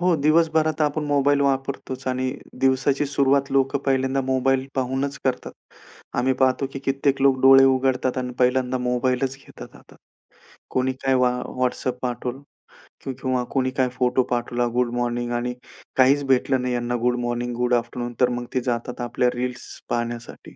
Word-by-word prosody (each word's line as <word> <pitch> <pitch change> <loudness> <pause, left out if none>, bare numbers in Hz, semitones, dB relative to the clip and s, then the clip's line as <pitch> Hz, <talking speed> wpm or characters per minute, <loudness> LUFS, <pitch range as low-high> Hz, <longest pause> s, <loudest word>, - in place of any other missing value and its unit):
हो 180 -1 +3
दिवसभरात 155 +1 +2
आपण 150 +1 0
मोबाईल 145 -1 +2
वापरतोच 135 -1 -2
आणि 130 0 -1 0.3
दिवसाची 135 +2 +2
सुरुवात 140 0 +1
लोकं 135 +1 +2
पहिल्यांदा 135 0 +1
मोबाईल 130 0 +1
पाहूनच 135 +2 -2
करतात. 130 -2 -2 0.7
आम्ही 130 +2 +2
पाहतो 130 +1 +1
की 135 - -5
कित्येक 135 0 0
लोक 135 -1 +4
डोळे 135 0 +8
उघडतात 130 -1 +1
आणि 125 0 -3
पहिल्यांदा 125 0 +2
मोबाईलच 125 +2 0
घेतात 135 - -13
हातात. - - -19 0.7
कोणी 130 +1 0
काय 135 0 +3
वा 125 -1 +3 0.3
WhatsApp 125 0 0
पाठवलं 125 +2 -4 0.6
किंवा 130 -1 -2
कोणी 130 -1 +1
काय 130 -1 +2
फोटो 125 0 +1
पाठवला 120 0 0
गुड 125 -1 +1
मॉर्निंग 120 0 -2
आणि 120 +1 -2 0.4
काहीच 135 +2 +4
भेटलं 130 0 +2
नाही 125 0 -1
यांना 120 0 -1
गुड 125 0 +2
मॉर्निंग, 120 0 -2
गुड 125 +1 0
आफ्टरनून 120 0 -1
तर 125 - +5
मग 120 0 -3
ते 130 - +1
जातात 120 0 -3
आपल्या 120 +1 +1
रील्स 125 0 -4 0.2
पाहण्यासाठी. 120 0 -5
130 Hz, 155 wpm, -23 LUFS, 125-135 Hz, 0.7 s, डोळे